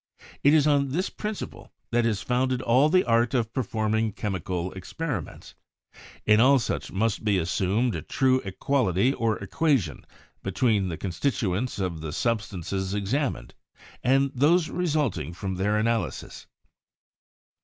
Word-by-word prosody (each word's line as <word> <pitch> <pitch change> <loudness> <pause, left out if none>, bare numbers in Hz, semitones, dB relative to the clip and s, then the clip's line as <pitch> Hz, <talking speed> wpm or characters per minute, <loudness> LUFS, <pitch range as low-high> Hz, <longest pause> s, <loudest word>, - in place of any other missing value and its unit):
It 145 +2 +5
is 150 -2 +4
on 140 -2 +3
this 185 +5 -1
principle 210 -1 -6 0.2
that 120 0 +2
is 110 -3 -1
founded 125 0 0
all 130 +6 +4
the 185 +3 +4
art 115 +2 +2
of 115 -2 0
perform 110 -4 -1
ing 110 -1 +1
chemical 95 -3 -3
experiments; 140 - -5 0.7
in 105 0 +5
all 135 +4 +6
such 120 - -3
must 110 +2 0
be 105 -3 +2
assumed 95 +7 0
a - - -3
true 130 -1 +2
equality 115 +2 +1
or 115 -4 0
equation 100 - 0 0.4
between 100 -1 +1
the 80 - -4
constituents 100 - -1
of 90 -5 -3
the 80 -2 -5
substances 100 -4 -2
examined, 125 +7 -2 0.5
and 135 +2 +3
those 155 +6 +3
resulting 145 - -1
from 95 +2 -4
their 95 +3 0
analy 110 -2 +1
sis." - - -10
115 Hz, 140 wpm, -26 LUFS, 95-135 Hz, 0.7 s, all